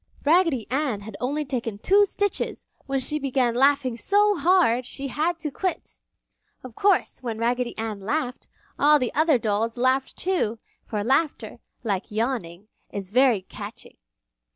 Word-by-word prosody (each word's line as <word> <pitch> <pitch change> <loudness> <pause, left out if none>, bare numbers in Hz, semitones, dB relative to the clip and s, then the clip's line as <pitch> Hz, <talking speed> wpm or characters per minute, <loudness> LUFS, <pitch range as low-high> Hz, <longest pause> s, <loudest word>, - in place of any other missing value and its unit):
Raggedy 315 - +3
Ann 265 -6 -1
had 205 0 -9
only 290 +4 -1
taken 235 -6 -3
two 400 - +4
stitches 405 0 -2 0.2
when 275 -1 0
she 300 +4 0
began 260 -4 +1
laughing 270 -1 +3
so 410 - +3
hard 330 -7 +3
she 275 +2 -5
had 320 +6 0
to 300 - -3
quit. 370 +6 -4 0.6
Of 255 -2 -10
course 390 - +1
when 230 -3 -4
Raggedy 240 +1 -1
Ann 220 -2 -4
laughed, 250 +5 -3 0.3
all 300 +1 +6
the 250 -4 -2
other 310 -2 +3
dolls 225 +1 -1
laughed 260 +2 +1
too, 350 - 0 0.3
for 210 -2 -2
laughter, 280 +6 0 0.2
like 200 -3 -2
yawning, 215 -5 -3 0.2
is 195 -1 -6
very 245 -5 +4
catching. - - -10
255 Hz, 150 wpm, -24 LUFS, 225-300 Hz, 0.6 s, all